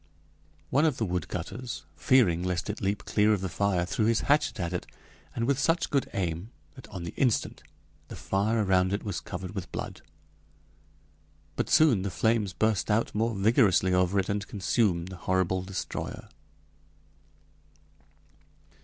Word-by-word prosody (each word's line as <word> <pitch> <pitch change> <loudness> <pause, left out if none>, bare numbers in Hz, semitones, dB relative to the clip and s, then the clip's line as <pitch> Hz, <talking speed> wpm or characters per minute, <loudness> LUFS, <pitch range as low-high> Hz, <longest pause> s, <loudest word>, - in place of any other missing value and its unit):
One 140 +3 +3
of 150 -5 +1
the 110 - 0
woodcutters, 95 +6 -4
fearing 100 -11 +3
lest 90 +2 -1
it 105 - -9
leap 100 +1 -1
clear 105 0 +3
of 100 - -1
the 95 - -2
fire, 90 0 0
threw 105 +4 0
his 115 0 +2
hatchet 145 -3 +1
at 85 0 -2
it, 90 - -3 0.5
and 115 - 0
with 135 +1 +1
such 165 +5 +1
good 140 -2 +1
aim 90 +1 -2 0.2
that 130 -6 -13
on 95 -5 -7
the 85 - -6
instant 125 -5 +1 0.5
the - - -8
fire 105 +3 0
around 95 -1 +2
it 100 - -2
was 100 -4 -3
covered 90 +2 -7
with 95 -4 -6
blood. - - -6 1.5
But - - -2
soon 145 -11 +5
the 100 - -2
flames 110 0 +1
burst 110 +2 0
out 110 +2 +1
more 115 +1 0
vigorously 95 -2 +3
over 90 +2 +2
it 95 - +1
and 100 0 -2
consumed 95 -3 0
the 95 - -8
horrible 95 +1 0
destroyer. 95 +1 -5
100 Hz, 155 wpm, -28 LUFS, 90-115 Hz, 1.5 s, soon